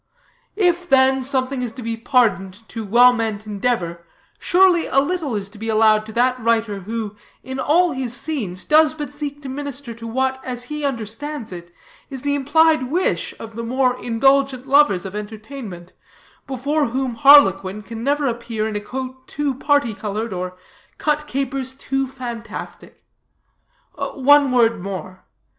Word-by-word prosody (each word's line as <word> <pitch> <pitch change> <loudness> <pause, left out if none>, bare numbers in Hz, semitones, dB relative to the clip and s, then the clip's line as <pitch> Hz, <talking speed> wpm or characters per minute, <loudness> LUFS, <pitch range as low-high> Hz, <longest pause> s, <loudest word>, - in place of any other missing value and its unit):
If, 355 -3 +1
then, 265 0 +4
something 260 0 -1
is 245 -2 -3
to 255 - -8
be 230 0 -2
pardoned 225 -4 0
to 225 - -5
well 240 +4 +6
meant 220 -3 -3
endeavor, 200 -5 -2 0.4
surely 360 -2 +4
a 270 - +3
little 295 -3 -1
is 200 -2 -3
to 210 0 -14
be 225 +1 -4
allowed 215 -1 +4
to 220 - -9
that 250 +2 +2
writer 225 -3 0
who, 215 +1 -5 0.3
in 260 0 -6
all 335 +6 +3
his 255 -3 -3
scenes, 220 - -4
does 310 0 +4
but 295 -2 -5
seek 290 0 -5
to - - -6
minister 275 -2 -6
to 230 0 -9
what, 265 +2 -1
as 245 -1 -3
he 300 +3 -5
understands 270 +1 -4
it, 175 -1 -9 0.4
is 265 -3 -6
the 285 0 0
implied 290 0 +3
wish 360 +5 0
of 225 -1 -9
the 230 - -4
more 250 +2 +1
indulgent 270 +2 +2
lovers 275 -10 +4
of 190 +1 -6
entertainment, 210 -3 -8 0.5
before 280 +3 0
whom 255 +1 -2
harlequin 210 -6 +5
can 225 +2 -7
never 285 +2 +1
appear 230 -3 -2
in 215 - -4
a 205 - -2
coat 260 +3 -7
too 290 -1 -2
parti 285 -3 +1
colored, 210 +1 -4
or 180 0 -5 0.4
cut 300 0 0
capers 265 -1 -3
too 270 0 -2
fantastic. 240 -3 -8 0.9
One 285 0 +3
word 230 -4 +3
more. 185 -1 -7
250 Hz, 160 wpm, -21 LUFS, 220-280 Hz, 0.9 s, well